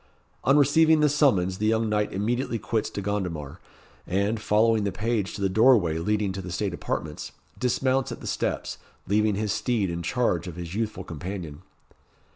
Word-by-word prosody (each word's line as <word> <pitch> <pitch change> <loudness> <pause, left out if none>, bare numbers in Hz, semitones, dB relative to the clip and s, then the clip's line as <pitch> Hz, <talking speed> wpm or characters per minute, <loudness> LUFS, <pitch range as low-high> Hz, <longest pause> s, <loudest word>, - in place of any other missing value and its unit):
On 135 +2 +4
receiving 155 +2 +5
the 150 - +5
summons 100 - +2
the 110 - +1
young 110 0 +2
knight 105 -1 0
immediately 115 +4 -1
quits 110 -1 -2
De 100 - -5
Gondomar, 90 -8 -3 0.5
and, 100 +4 0
following 110 +1 +3
the 100 - -1
page 105 0 -2
to - - -6
the 100 - +2
doorway 100 -6 +4
leading 105 +2 0
to 95 +1 -5
the 90 -1 -7
state 100 0 -2
apartments, 75 -3 -4 0.3
dismounts 130 +1 +1
at - - -6
the - - -10
steps, - - -2 0.3
leaving 105 +1 +2
his 105 0 -1
steed 110 -4 0
in 85 0 -4
charge 90 -2 0
of 85 - -7
his 85 -1 -7
youthful 105 -3 -3
companion. 85 -2 -6
105 Hz, 175 wpm, -26 LUFS, 90-115 Hz, 0.5 s, receiving